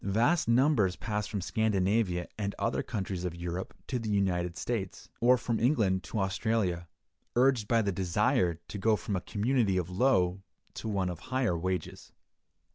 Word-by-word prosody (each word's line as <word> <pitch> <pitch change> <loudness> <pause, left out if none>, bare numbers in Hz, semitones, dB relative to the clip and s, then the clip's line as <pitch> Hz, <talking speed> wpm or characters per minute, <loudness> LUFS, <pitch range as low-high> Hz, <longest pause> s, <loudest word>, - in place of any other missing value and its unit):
Vast 115 - +2
numbers 115 - +3
pass 105 -1 -3
from 105 -2 -3
Scandinavia 100 -3 +1
and 100 -1 -3
other - - 0
countries 95 -3 -4
of 90 -2 -3
Europe 85 +2 -5
to 125 - -2
the 115 -2 -4
United 90 -4 0
States, 100 -4 -4
or 125 +2 +5
from 115 -2 -2
England 110 -8 +2
to 110 - -3
Australia, 95 -3 0 0.5
urged 125 -3 +3
by 115 -1 +3
the 100 - 0
desire 90 -1 +1
to 100 - -6
go 110 +2 +3
from 100 +1 -3
a 90 - -1
community 110 -2 +1
of 90 0 -2
low 95 -4 +2 0.3
to - - -6
one 95 -4 0
of 90 - -5
higher 130 -8 0
wages. 90 0 -4
100 Hz, 165 wpm, -30 LUFS, 90-115 Hz, 0.5 s, or